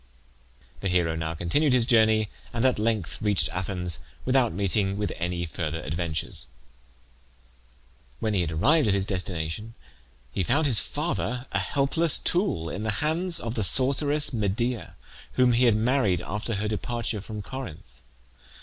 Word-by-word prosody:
The -, -, -2 dB
hero 85 Hz, -3 st, +1 dB
now 80 Hz, 0 st, -3 dB
continued 130 Hz, -, +1 dB
his 125 Hz, -2 st, +4 dB
journey, 110 Hz, -2 st, +3 dB, 0.2 s
and 115 Hz, +2 st, 0 dB
at 130 Hz, -4 st, +3 dB
length 110 Hz, -5 st, -1 dB
reached 100 Hz, -8 st, +2 dB
Athens 90 Hz, -2 st, -1 dB, 0.3 s
without 130 Hz, -2 st, +3 dB
meeting 100 Hz, +1 st, +1 dB
with 105 Hz, 0 st, -2 dB
any 85 Hz, 0 st, -2 dB
further 80 Hz, -1 st, -4 dB
adventures. 80 Hz, -4 st, -3 dB, 1.7 s
When 110 Hz, -1 st, -1 dB
he 95 Hz, -3 st, +2 dB
arrived 130 Hz, -, +3 dB
at 100 Hz, -, +3 dB
his 95 Hz, -1 st, 0 dB
destination 95 Hz, +3 st, -4 dB, 0.6 s
he 85 Hz, -, -2 dB
found 140 Hz, -, +1 dB
his 125 Hz, -7 st, +4 dB
father 125 Hz, +3 st, -2 dB
a -, -, 0 dB
helpless 145 Hz, +3 st, +1 dB
tool 175 Hz, -, 0 dB
in 95 Hz, -, -5 dB
the 110 Hz, -, -2 dB, 0.2 s
hands 170 Hz, +2 st, +1 dB
of 115 Hz, -1 st, -4 dB
the 110 Hz, -, -1 dB
sorceress 140 Hz, -, +4 dB
Medea, 115 Hz, +3 st, -1 dB, 0.4 s
whom 125 Hz, -1 st, +4 dB
he 125 Hz, +2 st, +4 dB
had 115 Hz, -3 st, +5 dB
married 110 Hz, -, +1 dB
after 105 Hz, +3 st, -3 dB
her 105 Hz, +2 st, -2 dB
departure 115 Hz, 0 st, -2 dB
from 105 Hz, 0 st, -7 dB
Corinth. 130 Hz, -, -9 dB
110 Hz, 150 wpm, -26 LUFS, 90-125 Hz, 1.7 s, had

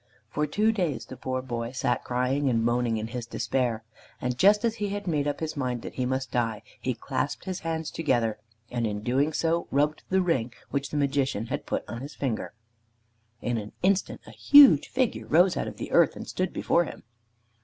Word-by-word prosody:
For 150 Hz, 0 st, 0 dB
two 210 Hz, +9 st, +2 dB
days 180 Hz, -10 st, -1 dB
the -, -, -9 dB
poor 130 Hz, 0 st, -3 dB
boy 120 Hz, -1 st, -4 dB
sat 125 Hz, -1 st, 0 dB
crying 130 Hz, +3 st, 0 dB
and 115 Hz, -2 st, +1 dB
moaning 120 Hz, -1 st, +1 dB
in 110 Hz, +1 st, -4 dB
his 120 Hz, 0 st, -5 dB
despair, 120 Hz, -2 st, -1 dB, 0.4 s
and 125 Hz, 0 st, -2 dB
just 205 Hz, -, +5 dB
as 230 Hz, 0 st, 0 dB
he 205 Hz, -2 st, -2 dB
had 205 Hz, 0 st, -4 dB
made 150 Hz, -5 st, 0 dB
up 145 Hz, -, -2 dB
his 160 Hz, 0 st, -3 dB
mind 125 Hz, -4 st, -2 dB
that -, -, -7 dB
he 125 Hz, -1 st, -1 dB
must 130 Hz, 0 st, -2 dB
die, 115 Hz, -3 st, -1 dB, 0.2 s
he -, -, -2 dB
clasped -, -, -3 dB
his 190 Hz, -1 st, -3 dB
hands 160 Hz, -1 st, -3 dB
together, 120 Hz, -8 st, 0 dB, 0.3 s
and 120 Hz, -2 st, 0 dB
in 105 Hz, -1 st, -3 dB
doing 135 Hz, +6 st, +1 dB
so 165 Hz, +2 st, 0 dB
rubbed 150 Hz, +3 st, +1 dB
the 190 Hz, 0 st, +3 dB
ring 130 Hz, -9 st, 0 dB, 0.2 s
which 140 Hz, 0 st, -1 dB
the 150 Hz, -, -3 dB
Magician 140 Hz, -5 st, 0 dB
had -, -, -4 dB
put -, -, -1 dB
upon 115 Hz, -, -7 dB
his 140 Hz, +2 st, -8 dB
finger. 125 Hz, -6 st, -3 dB, 0.9 s
In 120 Hz, -1 st, 0 dB
an 105 Hz, 0 st, -8 dB
instant 195 Hz, 0 st, +1 dB
a -, -, -11 dB
huge 280 Hz, -, +7 dB
figure 255 Hz, -2 st, -1 dB
rose 175 Hz, +4 st, +4 dB
out -, -, -2 dB
of -, -, -7 dB
the -, -, -6 dB
earth -, -, +4 dB
and -, -, -8 dB
stood 185 Hz, -1 st, -2 dB
before 175 Hz, -, +2 dB
him. -, -, -9 dB
135 Hz, 210 wpm, -27 LUFS, 120-170 Hz, 0.9 s, huge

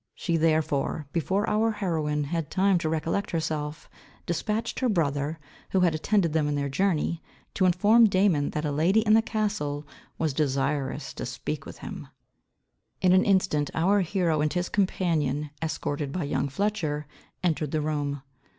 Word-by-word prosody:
She 170 Hz, -, -1 dB
therefore, 155 Hz, -2 st, +1 dB
before 190 Hz, +5 st, 0 dB
our 220 Hz, +1 st, +2 dB
heroine 155 Hz, -7 st, -1 dB
had 165 Hz, +1 st, -3 dB
time 190 Hz, -1 st, +3 dB
to 160 Hz, -, -1 dB
recollect 165 Hz, +5 st, -1 dB
herself, 155 Hz, -2 st, -3 dB, 0.4 s
dispatched 210 Hz, +6 st, -2 dB
her 255 Hz, -, +1 dB
brother, 150 Hz, -5 st, 0 dB, 0.3 s
who 190 Hz, -, +2 dB
had 175 Hz, -3 st, +3 dB
attended 170 Hz, +1 st, +1 dB
them 155 Hz, -2 st, +2 dB
in 145 Hz, -, 0 dB
their 140 Hz, -1 st, -1 dB
journey, 165 Hz, +1 st, 0 dB, 0.3 s
to 185 Hz, -, +2 dB
inform 210 Hz, +6 st, +5 dB
Damon 185 Hz, -7 st, +2 dB
that 150 Hz, 0 st, -3 dB
a 150 Hz, -, 0 dB
lady 170 Hz, +9 st, +3 dB
in 215 Hz, -1 st, +3 dB
the 225 Hz, -, +6 dB
castle 205 Hz, -11 st, -2 dB, 0.3 s
was 160 Hz, -3 st, 0 dB
desirous 140 Hz, -1 st, -1 dB
to -, -, -5 dB
speak -, -, -5 dB
with -, -, -9 dB
him. -, -, -7 dB, 0.9 s
In 185 Hz, -1 st, +4 dB
an 185 Hz, -, +5 dB
instant 185 Hz, -7 st, +2 dB
our 195 Hz, +5 st, +3 dB
hero 170 Hz, -4 st, +1 dB
and 150 Hz, 0 st, +1 dB
his 180 Hz, 0 st, -1 dB
companion, 155 Hz, -7 st, 0 dB
escorted 150 Hz, -3 st, -2 dB
by 175 Hz, +3 st, -2 dB
young 140 Hz, -1 st, -1 dB
Fletcher, 155 Hz, -3 st, -1 dB, 0.4 s
entered 160 Hz, -4 st, 0 dB
the 155 Hz, -, -1 dB
room. 145 Hz, -2 st, -2 dB
160 Hz, 160 wpm, -27 LUFS, 150-190 Hz, 0.9 s, the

